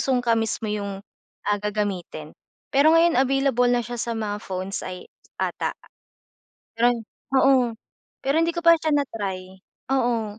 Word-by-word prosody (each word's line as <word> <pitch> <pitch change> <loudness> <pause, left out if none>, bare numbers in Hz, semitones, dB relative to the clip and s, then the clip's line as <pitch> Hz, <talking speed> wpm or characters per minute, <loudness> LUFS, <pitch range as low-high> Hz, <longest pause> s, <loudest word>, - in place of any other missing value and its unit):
sungka 245 -3 +1
mismo 225 0 -1
'yung 200 -1 -4 0.4
ah, 205 0 +1
gagamitin. 200 -7 -3 0.4
Pero 305 +4 +5
ngayon 330 -5 +4
available 270 -2 +2
na 240 -1 +2
siya 240 0 -5
sa 235 0 -2
mga 210 -2 -3
phones 185 +1 -4
ay 180 0 -7 0.3
ata. - - -2 1.0
Pero 245 +1 +4 0.4
oo. 260 -3 +4 0.5
Pero 275 +2 0
hindi 330 +1 +1
ko 340 - -3
pa 335 -1 +7
siya 315 -1 0
na-try, 195 -9 -3 0.3
oo. 235 -5 0
235 Hz, 140 wpm, -24 LUFS, 205-270 Hz, 1.0 s, pa